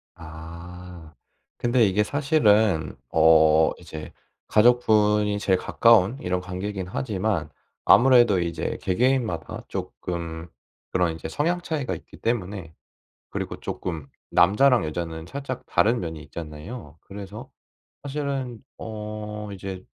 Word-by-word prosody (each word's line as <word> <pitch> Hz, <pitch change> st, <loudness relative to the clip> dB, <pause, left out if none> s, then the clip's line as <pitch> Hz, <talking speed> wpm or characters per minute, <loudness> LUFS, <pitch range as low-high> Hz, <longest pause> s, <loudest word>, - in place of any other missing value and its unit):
아. 85 Hz, +1 st, -11 dB, 0.4 s
근데 120 Hz, -1 st, +3 dB
이게 100 Hz, +1 st, +2 dB
사실은 110 Hz, -, +2 dB
어 80 Hz, -1 st, +5 dB
이제 80 Hz, -1 st, -9 dB, 0.4 s
가족분이 105 Hz, -3 st, +4 dB
제일 95 Hz, -2 st, +2 dB
가까운 115 Hz, +1 st, +4 dB
이런 90 Hz, -4 st, -1 dB
관계이긴 95 Hz, +1 st, -5 dB
하지만 100 Hz, -, -2 dB, 0.4 s
아무래도 120 Hz, -6 st, +6 dB
이제 85 Hz, -2 st, -2 dB
개개인마다 110 Hz, -, 0 dB
쪼끔 85 Hz, -1 st, -5 dB, 0.4 s
그런 90 Hz, -3 st, +1 dB
이제 80 Hz, -, -7 dB
성향 170 Hz, -, 0 dB
차이가 155 Hz, -6 st, -2 dB
있기 -, -, -13 dB
때문에 95 Hz, -7 st, -3 dB, 0.6 s
그리고 -, -, -4 dB
쪼끔 80 Hz, -6 st, -5 dB, 0.2 s
남자랑 115 Hz, +7 st, +4 dB
여자는 80 Hz, 0 st, -4 dB
살짝 135 Hz, +2 st, -5 dB
다른 115 Hz, +3 st, +2 dB
면이 80 Hz, -3 st, -5 dB
있잖아요. 80 Hz, -, -9 dB
그래서 100 Hz, +1 st, -9 dB, 0.5 s
사실은 140 Hz, -4 st, -3 dB, 0.2 s
어 105 Hz, -1 st, -6 dB
이제 95 Hz, -1 st, -7 dB
100 Hz, 260 characters per minute, -25 LUFS, 85-115 Hz, 0.6 s, 아무래도